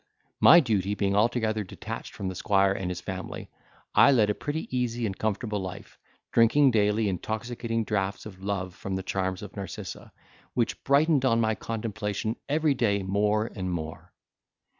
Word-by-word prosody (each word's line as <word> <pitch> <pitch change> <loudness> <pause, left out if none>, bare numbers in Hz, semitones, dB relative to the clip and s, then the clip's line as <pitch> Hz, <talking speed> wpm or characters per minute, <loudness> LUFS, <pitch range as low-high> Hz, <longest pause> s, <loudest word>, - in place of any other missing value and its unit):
My 170 - +9
duty 105 - 0
being 100 -1 0
altogether 110 0 +1
detached 110 +4 -7
from 100 - -4
the 95 - -3
squire 95 +1 +2
and 95 -2 -2
his 90 0 -4
family, 95 +1 -6 0.4
I - - +7
led 110 -6 +4
a - - 0
pretty 150 +8 -4
easy 120 -1 -1
and 95 -3 -2
comfortable 105 +1 -2
life, 95 -1 -8 0.3
drinking 130 +4 +5
daily 105 0 +2
intoxicating 115 +4 -2
draughts 100 -2 -2
of 95 -3 -10
love 95 -2 -2
from 95 +1 -5
the 95 - -3
charms 95 +1 -2
of 105 - -9
Narcissa, 95 -5 -7 0.4
which 120 -2 -1
brightened 145 0 +4
on 115 -3 +3
my 110 -1 +2
contemplation 110 -1 -3
every 155 0 +2
day 105 -6 +1
more 105 +3 +1
and 95 -3 -3
more. 80 -2 -6
105 Hz, 160 wpm, -27 LUFS, 95-115 Hz, 0.4 s, My